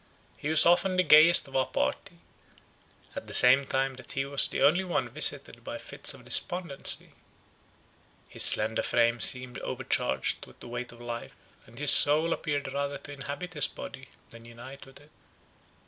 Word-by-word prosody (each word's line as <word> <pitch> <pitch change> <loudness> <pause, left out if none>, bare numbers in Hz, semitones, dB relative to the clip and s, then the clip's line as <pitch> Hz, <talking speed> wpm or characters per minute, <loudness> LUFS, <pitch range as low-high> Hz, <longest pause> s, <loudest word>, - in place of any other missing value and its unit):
He 145 - -7
was 160 0 +6
often 180 +2 +1
the 185 - +1
gayest 160 +1 +5
of 135 - -14
our 130 -1 -1
party, - - -5 1.0
at - - -9
the - - -3
same 130 +3 +5
time 135 0 -3
that 130 - -12
he 135 0 -4
was 140 0 +3
the - - -4
only 165 +7 +2
one 180 -2 -4
visited - - +1
by - - -8
fits - - -3
of - - -18
despondency; 175 -6 +1 1.2
his - - -5
slender 110 +1 +1
frame 120 0 -1
seemed 125 0 0
overcharged 65 0 -4
with - - -21
the - - -13
weight 120 +1 -8
of 120 - -18
life, 120 -1 -9 0.3
and 115 +2 -19
his 150 +1 +5
soul 155 +3 +5
appeared 145 -3 -6
rather 140 0 -5
to 145 - -12
inhabit 145 +6 -9
his 150 - +5
body 135 0 -12 0.2
than 115 0 -14
unite 125 +4 -14
with 135 - -17
it. 145 +1 -23
140 Hz, 175 wpm, -26 LUFS, 125-150 Hz, 1.2 s, was